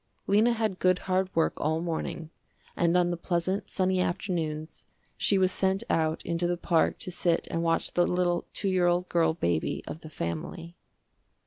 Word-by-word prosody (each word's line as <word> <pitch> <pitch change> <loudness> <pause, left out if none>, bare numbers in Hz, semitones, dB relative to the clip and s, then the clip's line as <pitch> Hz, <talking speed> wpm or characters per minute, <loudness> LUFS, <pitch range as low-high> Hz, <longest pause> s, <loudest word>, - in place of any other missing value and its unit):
Lena 215 +4 +4
had 220 -5 -1
good 185 0 +3
hard 185 0 +1
work 165 - +2
all 160 +2 0
morning, 165 -1 -4 0.4
and 170 0 +2
on 175 -1 +2
the 175 - -2
pleasant, 185 +3 -1
sunny 185 0 +1
afternoons 165 -4 -3 0.3
she 200 - +2
was 185 -1 +3
sent 190 +1 +1
out 160 0 0
into 170 +1 0
the 175 0 -1
park 170 -1 +1
to 185 - -6
sit 170 -1 0
and 165 - -1
watch 165 0 0
the 175 - +3
little 175 -1 0
two 200 - -3
year 185 -2 +2
old 175 +1 +1
girl 165 -2 +2
baby 85 - -1
of 160 - -7
the 155 - -9
family. 155 - -5
175 Hz, 180 wpm, -28 LUFS, 165-185 Hz, 0.4 s, Lena